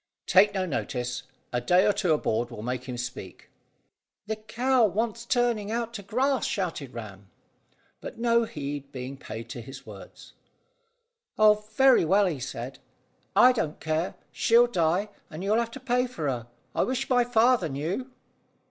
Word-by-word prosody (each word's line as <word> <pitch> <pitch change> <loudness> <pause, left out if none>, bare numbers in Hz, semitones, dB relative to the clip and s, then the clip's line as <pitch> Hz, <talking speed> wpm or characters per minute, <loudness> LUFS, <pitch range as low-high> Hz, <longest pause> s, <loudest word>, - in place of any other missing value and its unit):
"Take 200 +2 +5
no 190 -1 0
notice. 125 -5 -3 0.3
A 120 - 0
day 180 +10 +4
or 205 - +4
two 190 -4 0
aboard 120 -6 +1
will 110 -3 -8
make 125 +1 -3
him 125 -2 -5
speak." 120 -6 -7 0.7
"The 220 +1 -2
cow 240 +4 +1
wants 225 +3 0
turning 240 -5 +1
out 235 0 -2
to 215 - -5
grass," 255 +6 0
shouted 165 -10 -3
Ram; 100 -4 -9 0.7
but - - -8
no 235 0 +3
heed 145 -5 -6
being 130 0 -6
paid 115 -3 -8
to 120 - -6
his 135 +4 -11
words, - - -12 1.0
"Oh, 210 -1 +5
very 265 -5 +6
well," 195 +5 +4
he 165 -7 -1
said, 125 0 -6 0.6
"I 250 - +8
don't 160 -11 -2
care. 160 +2 -1 0.2
She'll 235 +1 +5
die, 185 -2 +1 0.2
and 160 +3 -7
you'll 210 +3 +2
have 235 -1 -1
to 250 - -9
pay 250 -1 +1
for 165 -12 -4
her. 120 -4 -2 0.3
I - - +1
wish 260 +1 -1
my 245 -2 +4
father 235 -5 +3
knew." 165 - -3
190 Hz, 165 wpm, -27 LUFS, -, 1.0 s, I